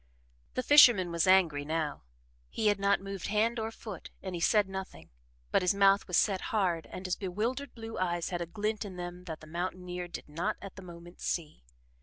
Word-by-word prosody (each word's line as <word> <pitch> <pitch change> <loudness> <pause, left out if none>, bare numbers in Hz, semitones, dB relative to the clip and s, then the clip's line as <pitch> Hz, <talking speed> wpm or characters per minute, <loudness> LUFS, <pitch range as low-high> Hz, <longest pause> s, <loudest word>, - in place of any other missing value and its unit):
The 255 - 0
fisherman 240 -12 +7
was 170 +1 +1
angry 170 -7 +4
now. 155 -1 -2 0.5
He 215 - +1
had 205 -1 +1
not 200 0 +2
moved 195 -2 -5
hand 225 +3 +1
or 220 0 -2
foot 215 -4 -9
and 190 -1 -5
he 170 - -4
said 210 +2 +4
nothing, 190 - -7 0.4
but - - +3
his 180 +2 +2
mouth 195 0 +4
was 180 - +1
set 195 -3 +2
hard 180 -6 0
and 185 - -8
his 185 - 0
bewildered 225 +9 -3
blue 225 -1 -7
eyes 175 -2 -1
had 175 -1 -2
a 170 - -3
glint 210 +3 -2
in 195 -3 -8
them 175 0 -7
that 160 -3 -7
the - - -11
mountaineer 180 +2 -4
did 170 - -8
not 170 +8 -2
at 195 - -9
the 190 - -9
moment 175 -1 -12
see. 155 - -3
185 Hz, 205 wpm, -31 LUFS, 175-205 Hz, 0.5 s, fisherman